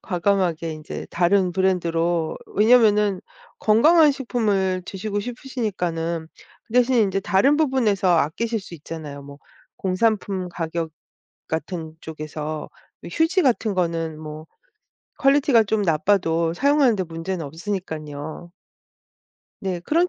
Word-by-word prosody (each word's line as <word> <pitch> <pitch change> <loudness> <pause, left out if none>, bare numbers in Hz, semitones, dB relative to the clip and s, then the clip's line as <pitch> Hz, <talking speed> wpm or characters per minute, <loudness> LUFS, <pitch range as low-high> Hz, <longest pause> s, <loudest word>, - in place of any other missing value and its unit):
과감하게 175 -4 0
인제 155 -1 -7
다른 180 +2 +2
브랜드로, 170 -3 0 0.2
왜냐하면은 210 -3 +4 0.4
건강한 300 +9 +5
식품을 205 -8 0
드시고 205 +1 -3
싶으시니까는 185 -10 -3 0.4
그 - - -17
대신에 250 0 +4
인제 195 -2 +1
다른 205 +10 +3
부분에서 245 -11 +2
아끼실 220 +10 0
수 185 -3 -11
있잖아요. 150 -2 -8
뭐 140 0 -12 0.4
공산품 195 -1 0
가격 165 -1 -3 0.6
같은 160 0 -4
쪽에서 155 -1 -6 0.3
이 - - -8
휴지 335 +4 +2
같은 225 -5 +1
거는 165 -3 -1
뭐 155 +1 -8 0.7
퀄리티가 275 -4 +4
좀 215 0 0
나빠도 165 -1 +1
사용하는 280 -3 +3
데 190 - -1
문제는 165 0 -5
없으니까요. 160 -2 -6 1.1
네, 185 -3 -3
그런 335 - +1
185 Hz, 285 characters per minute, -23 LUFS, 165-220 Hz, 1.1 s, 건강한